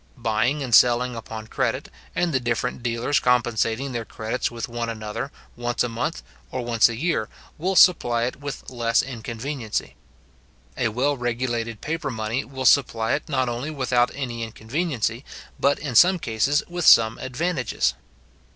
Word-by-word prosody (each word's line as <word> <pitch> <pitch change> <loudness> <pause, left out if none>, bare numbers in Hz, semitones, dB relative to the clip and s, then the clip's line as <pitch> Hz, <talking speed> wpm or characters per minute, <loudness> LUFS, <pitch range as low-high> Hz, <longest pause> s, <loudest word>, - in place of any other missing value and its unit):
Buying 120 +7 0
and 125 -3 -4
selling 125 +1 +5
upon 110 -1 -7
credit, - - -2 0.3
and 175 -2 +1
the 130 - +3
different 120 0 -2
dealers 120 +4 0
compensating 120 +1 +1
their 120 -2 -3
credits 110 +3 -3
with 120 -1 -5
one 120 -1 -3
another, 110 +4 -5 0.2
once 120 0 -1
a 120 - -1
month, 120 +8 -3 0.3
or 125 -2 -4
once 115 -1 +4
a 115 - -4
year, 125 -5 -1 0.3
will 190 +4 0
supply 120 -11 +5
it 125 - -2
with 145 -1 -7
less 115 -2 +1
inconveniency. 120 0 -4 0.8
A 125 - +1
well 130 +6 0
regulated 120 -2 -2
paper 155 -2 -3
money 115 +2 -2
will 130 -1 -6
supply 115 -4 +3
it 150 - -3
not 130 -3 +1
only 120 +5 -3
without 130 -4 +1
any 120 -4 -4
inconveniency, 115 +2 -2 0.4
but, 140 +1 +3
in 145 -4 -5
some 180 +10 +6
cases, 135 +1 +1
with 175 0 -4
some 115 -1 +7
advantages. 130 - -1
120 Hz, 155 wpm, -24 LUFS, 115-140 Hz, 0.8 s, some